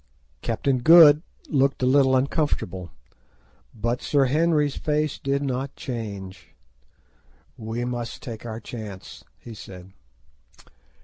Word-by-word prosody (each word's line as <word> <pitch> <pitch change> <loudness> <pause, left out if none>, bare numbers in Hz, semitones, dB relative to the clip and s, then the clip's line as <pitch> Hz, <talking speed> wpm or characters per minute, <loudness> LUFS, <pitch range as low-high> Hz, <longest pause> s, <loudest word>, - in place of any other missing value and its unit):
Captain 135 -2 0
Good 155 +1 +8 0.3
looked 135 -3 +1
a - - +4
little 130 0 +4
uncomfortable, 130 - -1 0.8
but 120 +2 -2
Sir 140 -2 +2
Henry's 150 +1 +1
face 150 -1 -1
did 140 +1 -1
not 135 0 -3
change. 100 -6 -7 1.0
"We 115 +2 -4
must 120 +2 -5
take 115 -6 -7
our 115 -1 -6
chance," 105 -4 -9
he 120 - -11
said. 95 -3 -11
125 Hz, 110 wpm, -24 LUFS, 110-145 Hz, 1.0 s, Good